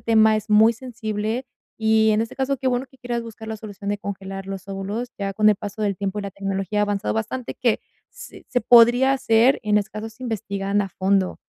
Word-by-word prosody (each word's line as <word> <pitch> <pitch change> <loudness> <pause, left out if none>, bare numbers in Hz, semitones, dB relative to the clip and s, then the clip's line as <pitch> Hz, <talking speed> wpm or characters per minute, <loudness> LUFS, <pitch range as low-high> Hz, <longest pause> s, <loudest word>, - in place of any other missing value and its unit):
tema 220 -1 +4
es 215 0 -5
muy 215 +2 +6
sensible 225 0 -4 0.3
y 220 0 +3
en 215 - +2
este 230 - -6
caso, 270 +1 -1
qué 265 - -5
bueno 250 +1 -1
que 265 - -23
quieras 240 -2 -3
buscar 225 -1 -10
la 220 - -4
solución 205 -1 -6
de 205 - -1
congelar 195 -1 -6
los 195 -1 -6
óvulos, 200 +5 -4
ya 195 -1 -3
con 215 +1 +4
el 210 - +2
paso 205 +2 -6
del 200 -1 +1
tiempo 200 +2 -3
y - - -3
la 200 - -5
tecnología 195 +1 -3
ha - - +4
avanzado 205 0 -1
bastante, 225 +3 -3
que 235 -3 +1 0.3
s - - -12
se 245 - +1
podría 240 +3 +6
hacer, 260 -1 +3
en 210 -1 +2
estos 210 0 0
casos, 220 +1 -7
investigando 205 -4 -1
a - - -6
fondo. 190 0 0
215 Hz, 220 wpm, -23 LUFS, 200-230 Hz, 0.3 s, muy